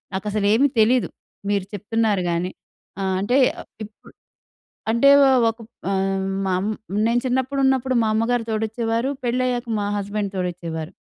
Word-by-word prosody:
నాకసలేమీ 210 +5 +2
తెలీదు. 240 +3 +3 0.4
మీరు 200 -2 0
చెప్తున్నారు 210 0 0
గానీ 170 +2 -1 0.5
ఆహ్, 190 -1 0
అంటే, 215 +6 0 0.3
ఆహ్, - - -15 0.2
ఇప్పు 215 0 -14 0.8
అంటే 235 +5 +4
వ - - +7 0.3
ఒక‌ప్ 225 0 -12 0.2
ఆహ్, 195 0 0 0.2
మా 190 - 0
అం 195 - -2 0.4
నేను 235 +1 +2
చిన్నప్పుడున్నప్పుడు 260 0 +1
మా 220 - +1
అమ్మగారు 230 +2 +1
తోడొచ్చేవారు. 225 +3 -1
పెళ్ళయ్యాక 250 0 0
మా 205 - -1
హస్బెండ్ 200 0 -3
తోడొచ్చేవారు. 170 -2 -4
220 Hz, 130 wpm, -22 LUFS, 195-245 Hz, 0.8 s, వ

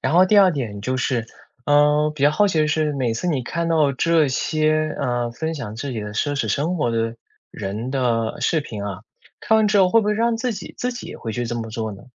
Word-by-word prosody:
然 130 - -1
后 180 +2 +6
第 210 +2 +5
二 195 -2 +7
点 110 -9 -4
就 130 +4 -1
是， 120 -2 -1 0.4
嗯， 150 +1 +3
比 145 - -5
较 145 - +6
好 205 +7 +3
奇 185 -5 0
的 155 - +2
是 155 -1 +1
每 125 -5 -1
次 120 - -3
你 145 -7 0
看 170 +7 -3
到 155 -4 +3
这 160 +2 +2
些， 155 +3 0
啊， 120 -3 -1
分 160 +7 -4
享 115 -8 -6
自 140 +4 -4
己 110 - -3
的 105 0 -6
奢 145 +7 -1
侈 145 - -1
生 165 +6 0
活 135 -7 0
的 115 0 -1 0.3
人 105 +4 -5
的 120 -4 -1
视 160 - +1
频 105 -8 -6
啊， 100 -1 -5 0.4
看 220 - +3
完 220 - +3
之 205 0 +3
后 190 -2 +5
会 230 +5 +4
不 210 - -3
会 210 - +2
让 230 +1 +1
自 245 +2 -1
己 210 - -8
自 250 0 -2
己 240 - -8
也 - - -8
会 115 - -5
去 120 +2 -3
这 120 - -3
么 115 -1 -5
做 110 0 -3
呢？ 100 - -12
145 Hz, 275 characters per minute, -22 LUFS, 115-165 Hz, 0.4 s, 二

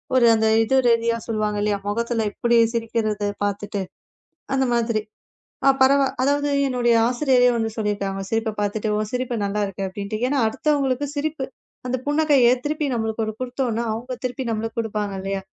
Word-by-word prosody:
ஒரு 250 -2 +5
அந்த 220 0 +2 0.2
இது 225 +4 +1
ரீதியா 230 0 +2
சொல்லுவாங்க, 215 -2 -1
இல்லயா. 205 -1 +1
முகத்துல 230 +1 -1
இப்படி 235 +3 +1 0.2
சிரிக்கிறது 220 -3 -1 0.2
பாத்துட்டு 205 0 -2 0.7
அந்த 265 0 +2
மாதிரி. 230 -2 +1 0.6
அ - - +7
பரவா 275 +1 +5 0.2
அதாவது 285 +1 +1 0.2
என்னுடைய 245 -2 +2
ஆசிரியரே 250 -1 +3
வந்து 225 -1 -1
சொல்லியிருக்காங்க. 200 -2 -2
சிரிப்ப 225 -1 0
பாத்துட்டு, 205 +1 -1
உன் 215 0 -3
சிரிப்பு 250 -1 -1
நல்லா 205 +1 -1
இருக்கு 195 0 -5
அப்படின்ட்டு. 200 +2 -5
ஏன்னா, 280 +1 +1
அடுத்தவங்களுக்கு 285 +1 0
சிரிப்பு 290 -2 -2 0.4
அந்தப் 255 0 -2
புன்னகைய 290 -5 +4 0.2
திருப்பி 300 0 -1
நம்மளுக்கு 220 -1 -1
ஒரு - - -1
குடுத்தோம்னா 245 -2 -2
அவங்க 245 +4 -5
திருப்பி 255 +1 -3
நம்மளுக்கு 225 +1 -3
கொடுப்பாங்க 210 -3 -2
இல்லையா? 195 0 -3
230 Hz, 155 wpm, -22 LUFS, 215-255 Hz, 0.7 s, அ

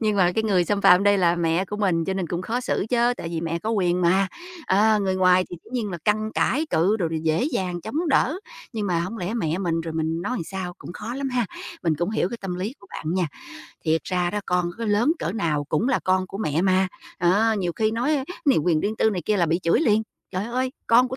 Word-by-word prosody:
Nhưng 215 -2 +1
mà 180 -2 +4
cái 220 - 0
người 185 -5 +3
xâm 200 +3 0
phạm 180 +1 +6
đây 205 -1 +4
là 175 -1 +3
mẹ 170 +2 +1
của 210 +2 -6
mình 180 -6 +1
cho 190 - -2
nên 185 -3 -2
cũng 175 +2 -3
khó 235 +6 -2
xử 225 - -1
chớ, 240 0 +3
tại 165 - -5
vì 165 -1 -3
mẹ 165 0 -2
có 220 +6 -3
quyền 180 -4 +1
mà, 185 +2 +3 0.4
à, 210 +3 +4
người 190 -2 0
ngoài 185 0 +4
thì 175 - -6
dĩ - - -16
nhiên 225 -5 -2
là 175 - -5
căn 215 +1 +1
cãi 305 +5 +1
cự 190 +7 +3
rồi 170 -6 -1
đồ, 160 - -3
dễ 160 +9 +1
dàng 180 -2 -2
chống 310 - -2
đỡ, 310 +5 +2 0.3
nhưng 215 -2 -2
mà 175 -2 +1
hổng 185 +7 -4
lẽ 185 +6 -3
mẹ 170 -5 -1
mình 165 -3 0
rồi 165 -1 -5
mình 160 +1 -1
nói 250 - -2
làm - - -3
sao, 185 -1 -5
cũng - - -9
khó 220 +5 -6
lắm 275 0 -2
ha, 245 -4 0 0.4
mình 165 -3 +2
cũng 175 +4 0
hiểu 215 -4 0
cái 235 - -5
tâm 190 -2 -4
lý 190 +6 -3
của 200 - -17
bạn 160 +3 -4
nha. 180 -3 +1 0.6
Thiệt 160 0 +1
ra 180 -1 0
đó, 210 - -2
con 180 -1 +1
có 230 - -3
lớn 220 +8 +3
cỡ 170 - -2
nào 160 -9 -1
cũng 160 - 0
là 265 - +2
con 185 0 +2
của 195 - -8
mẹ 160 -4 0
mà, 190 0 +3 0.3
đó, 205 +6 +3
nhiều 175 -2 -1
khi 215 0 +2
nói 250 +7 +1
á 265 - -2 0.2
này 275 - +4
quyền 155 0 +2
riêng 215 +2 -2
tư 220 - +3
này 185 -4 -3
kia 210 - +1
là 170 -3 +2
bị 165 +2 +1
chửi 170 - +3
liền: 220 -6 +3 0.3
"Trời 185 +1 -2
ơi, 255 +2 -1
con 245 +2 +5
của 260 - -5
190 Hz, 270 wpm, -24 LUFS, 175-220 Hz, 0.6 s, phạm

